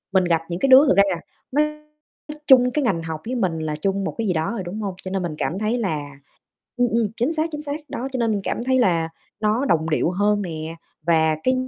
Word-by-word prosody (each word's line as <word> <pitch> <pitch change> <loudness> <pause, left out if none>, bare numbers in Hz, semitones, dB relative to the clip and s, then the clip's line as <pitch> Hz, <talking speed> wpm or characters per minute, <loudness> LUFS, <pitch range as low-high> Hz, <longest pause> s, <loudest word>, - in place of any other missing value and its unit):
mình 190 -1 +4
gặp 165 -2 +1
những 175 +1 -4
cái 275 - +2
đứa 265 +3 +8
thật 275 - +4
ra, 200 - +8
à, - - -9 0.3
nó 295 +3 +3 0.8
chung 250 -2 +6
cái 290 +3 -1
ngành 185 -9 0
học 160 -1 -5
với 250 - -2
mình 185 -9 0
là 155 -1 -3
chung 195 +5 -1
một - - -3
cái 225 - -1
gì 190 - +2
đó 160 -1 -1
rồi, 230 -5 -3
đúng 195 +5 -5
hông? 195 -3 -3
Cho 185 - -6
nên 190 -1 -1
mình 170 -3 -3
cảm 175 - -2
thấy 215 +3 0
là 145 -9 -3 0.6
ừm, 245 0 +3
ừm, 230 -1 +1
chính 255 +8 0
xác, 320 +1 -1
chính 300 -1 -5
xác, 295 0 -4
đó, 255 - -4
cho 260 - -3
nên 230 -2 +1
mình 205 -2 -1
cảm - - -2
thấy 260 0 +3
là 170 -8 +2 0.3
nó 215 +5 +1
đồng 160 - +1
điệu 160 +2 +1
hơn 205 +2 +1
nè, 160 -3 -5 0.3
và 160 -1 +3
cái 255 - +3
200 Hz, 255 wpm, -22 LUFS, 165-245 Hz, 0.8 s, đứa